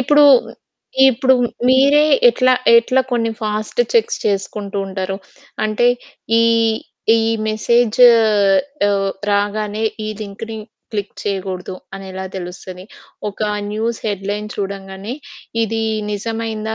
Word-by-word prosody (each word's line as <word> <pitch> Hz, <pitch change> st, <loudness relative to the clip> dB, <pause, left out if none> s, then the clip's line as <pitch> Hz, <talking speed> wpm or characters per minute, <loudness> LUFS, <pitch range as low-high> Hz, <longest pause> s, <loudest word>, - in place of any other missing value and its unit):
ఇప్పుడు, 295 Hz, +3 st, +5 dB, 0.9 s
ఇప్పుడు 260 Hz, +2 st, +3 dB, 0.3 s
మీరే 280 Hz, +3 st, +5 dB, 0.3 s
ఎట్లా, 255 Hz, -, +3 dB, 0.2 s
ఎట్లా 255 Hz, +3 st, +2 dB
కొన్ని 230 Hz, -2 st, +1 dB
ఫాస్ట్ 215 Hz, -, -2 dB
చెక్స్ 465 Hz, -, +2 dB
చేసుకుంటూ 200 Hz, 0 st, -2 dB
ఉంటారు? 190 Hz, 0 st, -4 dB, 0.5 s
అంటే 215 Hz, +3 st, +1 dB, 0.6 s
ఈ, -, -, +4 dB, 0.7 s
ఈ -, -, +2 dB, 0.3 s
మెసేజు 235 Hz, +2 st, +4 dB, 0.8 s
ఆహ్, 195 Hz, -1 st, 0 dB, 0.2 s
రాగానే 205 Hz, +1 st, -1 dB, 0.2 s
ఈ -, -, -3 dB
లింకుని 215 Hz, +2 st, -7 dB, 0.4 s
క్లిక్ 205 Hz, -2 st, -4 dB
చేయకూడదు 190 Hz, -2 st, -4 dB, 0.2 s
అనెలా 190 Hz, -1 st, -7 dB
తెలుస్తది? 180 Hz, 0 st, -8 dB, 0.5 s
ఒక 200 Hz, -, -10 dB, 0.3 s
న్యూస్ 225 Hz, +2 st, -2 dB
హెడ్‌లైన్ 205 Hz, +1 st, -3 dB
చూడంగానే 195 Hz, +2 st, -5 dB, 0.5 s
ఇది 225 Hz, 0 st, -1 dB, 0.3 s
నిజమయిందా? 220 Hz, +1 st, -3 dB
210 Hz, 100 wpm, -18 LUFS, 195-230 Hz, 0.9 s, ఇప్పుడు